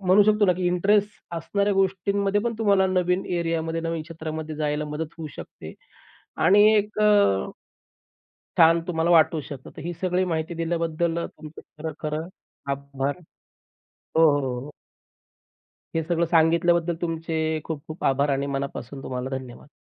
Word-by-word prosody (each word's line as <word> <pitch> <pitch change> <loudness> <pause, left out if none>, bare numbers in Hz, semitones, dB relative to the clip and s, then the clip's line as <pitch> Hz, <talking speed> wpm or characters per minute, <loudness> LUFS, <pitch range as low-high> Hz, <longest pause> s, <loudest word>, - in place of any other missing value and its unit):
म्हणू 190 +2 +5
शकतो 210 0 +3
ना, 180 - +5
की 180 0 -2
इंटरेस्ट 200 +4 +2 0.3
असणाऱ्या 200 +5 0
गोष्टींमध्ये 195 +1 +1
पण 235 0 -2
तुम्हाला 200 -3 +3
नवीन 180 0 +1
एरियामध्ये, 165 -1 -1
नवीन 165 -1 -3
क्षेत्रामध्ये 160 -1 -6
जायला 150 0 -1
मदत 150 +2 -4
होऊ 160 - -5
शकते - - -10 0.7
आणि 200 +5 +6
एक 210 0 0
अ 205 - +4 1.1
छान 165 0 +6
तुम्हाला 165 0 +1
वाटू 165 -1 +5
शकतं. 135 -2 -9
तर - - -6
ही 175 +1 -3
सगळी 185 0 +1
माहिती 160 +1 -2
दिल्याबद्दल 165 0 -1
तुमचं 155 0 -11 0.2
खरं, 160 -1 -4
खरं 155 +2 -3 0.4
आभार. 140 +1 -3 1.0
हो, 160 -1 +6
हो, 135 -2 -2
हो. 145 +3 -9 1.2
हे 165 - +2
सगळं 170 +1 +1
सांगितल्याबद्दल 170 +1 +3
तुमचे 160 -1 -1
खूप-खूप 155 +1 -7
आभार 140 +2 +2
आणि 140 0 0
मनापासून 135 -1 -5
तुम्हाला 125 +1 -4
धन्यवाद! 130 0 -11
165 Hz, 140 wpm, -25 LUFS, 155-180 Hz, 1.2 s, आणि